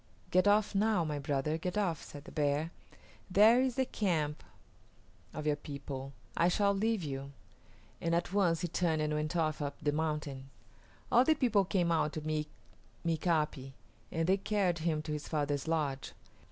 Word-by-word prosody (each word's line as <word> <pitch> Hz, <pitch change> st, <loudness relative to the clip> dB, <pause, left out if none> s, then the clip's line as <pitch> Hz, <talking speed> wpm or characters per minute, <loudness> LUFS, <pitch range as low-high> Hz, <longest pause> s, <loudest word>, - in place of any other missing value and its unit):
"Get 185 Hz, +2 st, +4 dB
off 205 Hz, +1 st, +4 dB
now, 205 Hz, -2 st, +2 dB
my 150 Hz, -2 st, -2 dB
brother, 145 Hz, +3 st, -1 dB
get 180 Hz, +4 st, -3 dB
off," 175 Hz, -7 st, 0 dB
said 145 Hz, -1 st, -10 dB
the 180 Hz, -, -11 dB
bear. 150 Hz, +2 st, 0 dB, 0.6 s
"There 215 Hz, +6 st, +6 dB
is 260 Hz, -2 st, 0 dB
the 265 Hz, -, +2 dB
camp 160 Hz, -10 st, -1 dB, 0.9 s
of 155 Hz, 0 st, -6 dB
your 150 Hz, -1 st, +2 dB
people. 140 Hz, -2 st, -7 dB, 0.2 s
I 170 Hz, -, +3 dB
shall 200 Hz, +2 st, +3 dB
leave 215 Hz, -1 st, 0 dB
you"; 140 Hz, -1 st, -5 dB, 0.7 s
and 170 Hz, 0 st, +1 dB
at 175 Hz, +2 st, -1 dB
once 175 Hz, -5 st, +2 dB
he 175 Hz, -, 0 dB
turned 160 Hz, -2 st, 0 dB
and 150 Hz, 0 st, 0 dB
went 150 Hz, +3 st, -2 dB
off 155 Hz, -3 st, 0 dB
up 145 Hz, -1 st, -3 dB
the 145 Hz, -, +1 dB
mountain. 150 Hz, -3 st, -3 dB, 0.6 s
All 245 Hz, -, +6 dB
the 315 Hz, +4 st, +4 dB
people 225 Hz, -8 st, +3 dB
came 175 Hz, -2 st, +1 dB
out 155 Hz, -2 st, +1 dB
to 155 Hz, -, -4 dB
meet 155 Hz, 0 st, -2 dB, 0.6 s
Mika´pi, 155 Hz, -5 st, 0 dB, 0.4 s
and 165 Hz, 0 st, 0 dB
they 190 Hz, +1 st, +4 dB
carried 195 Hz, -4 st, 0 dB
him 155 Hz, -2 st, 0 dB
to 155 Hz, -, -5 dB
his 150 Hz, 0 st, -4 dB
father's 145 Hz, -1 st, -1 dB
lodge. 150 Hz, -5 st, -1 dB
160 Hz, 175 wpm, -32 LUFS, 150-190 Hz, 0.9 s, There